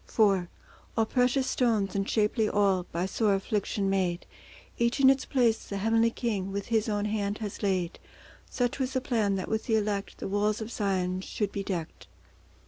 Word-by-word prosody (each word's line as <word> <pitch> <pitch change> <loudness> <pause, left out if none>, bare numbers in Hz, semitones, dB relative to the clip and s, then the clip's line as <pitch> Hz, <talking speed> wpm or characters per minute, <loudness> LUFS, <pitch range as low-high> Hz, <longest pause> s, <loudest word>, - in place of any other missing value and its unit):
IV 195 -5 +3 0.5
All 225 - +4
precious 250 +3 +2
stones 220 -8 +1
and 195 0 -1
shapely 215 0 +2
all, 195 -3 +2
By 170 +2 -1
sore 200 +1 +1
affliction 200 0 -1
made; 185 -3 0 0.5
Each 235 +2 +1
in 270 -1 +8
its 270 0 -1
place 235 -4 +2
the 200 - -4
Heavenly 225 +3 +3
King 210 -5 -2
With 200 +2 -4
His 225 -1 +1
own 205 -1 0
hand 205 -1 -1
has 210 -3 -6
laid— 185 -4 -1 0.5
Such 245 +1 -1
was 260 0 -1
the 260 - 0
plan, 215 -6 +1
that 185 - -3
with 220 0 -2
the 225 - +3
Elect 205 -2 -1
The - - -5
walls 205 +2 +1
of 220 +1 -6
Zion 185 -4 -1
should 205 +1 -3
be 200 - -3
decked. 180 -5 -5
210 Hz, 185 wpm, -28 LUFS, 195-225 Hz, 0.5 s, in